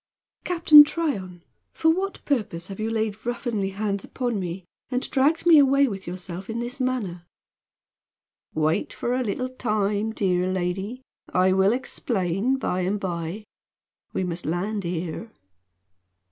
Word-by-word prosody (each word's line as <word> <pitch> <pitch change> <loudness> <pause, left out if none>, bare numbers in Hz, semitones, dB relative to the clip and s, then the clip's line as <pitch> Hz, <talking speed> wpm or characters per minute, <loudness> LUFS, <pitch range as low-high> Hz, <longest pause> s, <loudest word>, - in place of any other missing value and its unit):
"Captain 330 -4 +8
Tryon, 200 - -3 0.3
for 320 - +3
what 385 +4 -3
purpose 205 -10 -1
have 195 - -7
you 220 +1 -1
laid 220 -2 -2
ruffianly 240 -5 -2
hands 200 -1 -2
upon 245 -5 -2
me 180 0 -5 0.2
and 255 0 -1
dragged 290 +5 +2
me 330 -3 +8
away 275 0 +5
with 195 -6 -6
yourself 180 +2 -6
in 225 +1 -3
this 245 +3 -5
manner?" 205 -10 -2 1.3
"Wait 155 +4 +1
for 240 - -2
a 255 - +1
little 255 +3 -2
time, 215 -3 -1
dear 185 -3 0
lady. 190 +7 -3 0.3
I 185 +1 +3
will 190 +1 +4
explain 230 -2 -1
by 185 -8 -1
and 190 +3 0
by. 175 +2 -4 0.7
We - - -1
must 175 -2 -4
land 195 +4 -2
here." 175 +5 -4
205 Hz, 140 wpm, -25 LUFS, 185-255 Hz, 1.3 s, Captain